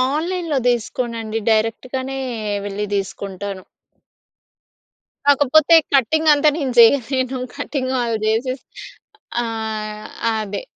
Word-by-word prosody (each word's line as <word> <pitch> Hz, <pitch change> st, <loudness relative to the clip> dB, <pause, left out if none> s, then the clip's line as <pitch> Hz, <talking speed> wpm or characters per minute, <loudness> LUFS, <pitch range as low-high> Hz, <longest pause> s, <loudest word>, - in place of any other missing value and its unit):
ఆన్‌లైన్‌లో 335 Hz, -2 st, -1 dB
దీసుకోనండి. 230 Hz, -2 st, -1 dB
డైరెక్ట్‌గానే 255 Hz, +5 st, -1 dB, 0.5 s
వెళ్ళి 205 Hz, +1 st, -3 dB
దీసుకుంటాను. 195 Hz, 0 st, -5 dB, 1.6 s
కాకపోతే 290 Hz, +3 st, +5 dB, 0.2 s
కటింగ్ 310 Hz, +5 st, +3 dB
అంతా 295 Hz, +1 st, +4 dB
నేను 265 Hz, -5 st, -2 dB
జెయ్యలేను 260 Hz, +2 st, +4 dB, 0.2 s
కటింగ్ 270 Hz, -2 st, -3 dB
ఆళ్ళు 230 Hz, -2 st, -1 dB
జేసేసి 250 Hz, +4 st, -1 dB, 0.8 s
ఆ! -, -, -1 dB, 0.9 s
అదే. 210 Hz, -2 st, -3 dB
255 Hz, 85 wpm, -20 LUFS, 220-280 Hz, 1.6 s, కాకపోతే